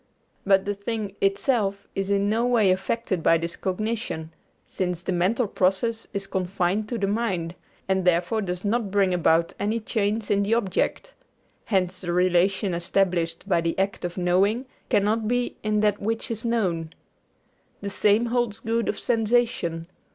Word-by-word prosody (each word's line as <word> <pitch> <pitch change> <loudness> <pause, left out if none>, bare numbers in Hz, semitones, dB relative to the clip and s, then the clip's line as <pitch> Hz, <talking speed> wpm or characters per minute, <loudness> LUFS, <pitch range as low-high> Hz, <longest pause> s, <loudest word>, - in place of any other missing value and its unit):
But 195 -1 +4
the 205 - 0
thing 205 0 -4
itself 200 0 +1
is 195 0 -2
in 200 0 +2
no 220 +3 +1
way 225 -6 +4
affected 190 0 -1
by 165 - +4
this 170 +1 -4
cognition, 195 -5 -3 0.3
since 180 -2 -3
the - - -2
mental 195 +7 +1
process 200 +5 0
is 195 -1 -3
confined 190 +2 -1
to 240 - -2
the 200 - 0
mind, 195 -6 -1 0.3
and 190 0 +1
therefore 180 +5 +2
does 180 0 -4
not 220 0 0
bring 195 -2 +2
about 170 -1 +2
any 215 +3 0
change 215 -1 -1
in 200 0 +3
the 205 +3 +2
object. 230 - -1 0.5
Hence 185 -2 0
the 175 -1 -2
relation 185 +2 +2
established 170 0 0
by 170 -4 +2
the 165 0 -2
act 195 +1 -1
of 175 +1 -4
knowing 195 +7 +2 0.2
cannot 215 +2 +2
be 245 +1 -1
in 210 0 +1
that 210 -1 +1
which 225 +3 -2
is 225 -1 -3
known. 180 -9 -1 0.9
The 200 0 -4
same 210 +4 +3
holds 240 -3 0
good 230 +1 -1
of - - -1
sensation. 225 -8 0
200 Hz, 160 wpm, -25 LUFS, 180-220 Hz, 0.9 s, But